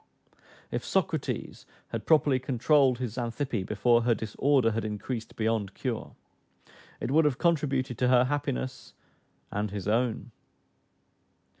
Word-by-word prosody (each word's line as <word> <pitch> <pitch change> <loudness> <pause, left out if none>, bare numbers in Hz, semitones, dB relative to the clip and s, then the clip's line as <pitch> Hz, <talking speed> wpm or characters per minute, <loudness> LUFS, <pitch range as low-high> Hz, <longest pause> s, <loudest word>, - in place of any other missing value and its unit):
If - - -2
Socrates - - -2 0.2
had - - -5
properly 145 -4 +4
controlled 130 +1 +3
his 125 -4 -4
Xantippe 120 -1 -2
before 120 +3 +3
her 120 0 +2
disorder 115 +2 +1
had 110 0 -2
increased 110 +2 -5
beyond 110 -3 -1
cure, 125 -4 -4 0.8
it 120 - -3
would 155 +2 +4
have 140 -4 +2
contributed 135 -7 0
to 125 - +3
her 125 -1 +5
happiness 130 -1 -3 0.6
and 105 +1 -2
his 100 -1 -5
own. 120 +2 0
125 Hz, 125 wpm, -28 LUFS, 115-135 Hz, 0.8 s, her